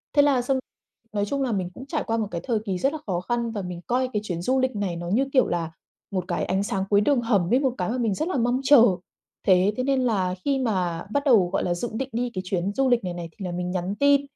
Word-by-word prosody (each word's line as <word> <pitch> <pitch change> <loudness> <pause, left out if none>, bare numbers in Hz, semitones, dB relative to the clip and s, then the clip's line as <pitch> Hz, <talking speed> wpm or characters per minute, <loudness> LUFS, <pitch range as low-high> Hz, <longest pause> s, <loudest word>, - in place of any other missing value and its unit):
thế 290 - +7
là 280 -3 +3
xong 260 +2 0 0.5
nói 205 -1 0
chung 275 +6 -2
là 255 - -1
mình 190 -4 -1
cũng 260 - -9
trải 295 +1 -2
qua 225 - +1
một 220 -2 -1
cái 170 - -3
thời 230 -4 0
kỳ 190 -3 -1
rất 270 - +1
là 315 - -4
khó 180 -3 0
khăn 235 +3 -1
và 210 -3 -3
mình 180 -2 -6
coi 255 +1 +1
cái 210 - 0
chuyến 175 -4 -3
du 260 +8 +1
lịch 260 -2 0
này 200 -4 -2
nó 170 0 -5
như, 240 +9 +2
kiểu 260 - +4
là, 165 -2 -2 0.4
một 185 -3 -2
cái 175 -2 -1
ánh 190 +2 0
sáng 195 -1 -1
cuối 205 0 +4
đường 260 +3 +2
hầm 205 -5 +1
ấy, 255 - +5
một 265 -3 +1
cái 180 - -1
mà 245 - -1
mình 230 -5 +1
rất 310 - -2
là 325 - -1
mong 245 +2 +1
chờ. 265 -3 +7 0.6
Thế 190 +2 +5
thế 255 - 0
nên 270 0 +1
là 195 -7 +1
khi 275 -1 +1
mà 185 -9 -1
bắt 285 +3 +1
đầu, 220 -10 +5
gọi - - +1
là, 175 - 0
dự 230 +7 -3
định 265 +4 -3
đi 245 +2 -1
cái 185 - -3
chuyến 185 +1 -1
du 270 +3 +2
lịch 245 -3 +3
này 180 -1 -3
này 170 -1 -6
thì 190 - -8
là 180 - -3
mình 180 +1 -3
nhắn 185 +2 -2
tin, 285 0 +5
215 Hz, 295 wpm, -25 LUFS, 180-260 Hz, 0.6 s, thế